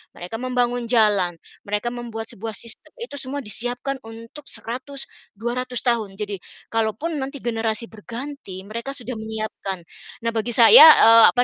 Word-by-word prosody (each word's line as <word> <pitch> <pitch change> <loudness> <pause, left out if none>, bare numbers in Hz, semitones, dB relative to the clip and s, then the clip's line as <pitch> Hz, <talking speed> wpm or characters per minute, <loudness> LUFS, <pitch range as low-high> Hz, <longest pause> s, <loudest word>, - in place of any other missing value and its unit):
Mereka 180 +6 -6
membangun 245 -1 -1
jalan, 210 -7 +3 0.3
mereka 210 +4 -1
membuat 230 -2 -6
sebuah 220 +1 -6
sistem, 230 - -7
itu 465 -13 -6
semua 275 +1 -3
disiapkan 245 +5 -3
untuk 230 +6 -11
100, 255 +5 -5 0.3
200 245 +3 -3
tahun. 225 -6 0
Jadi, 205 -2 -5 0.3
kalaupun 225 +8 -1
nanti 275 -1 -6
generasi 225 -1 -2
berganti, 230 -3 -8
mereka 235 +7 -6
sudah 245 -2 -6
menyiapkan. 215 -4 -5 0.4
Nah 230 - 0
bagi 230 +1 -1
saya, 235 +6 +10
eee, 230 0 +8
apa 245 - +4
230 Hz, 140 wpm, -22 LUFS, 220-255 Hz, 0.4 s, saya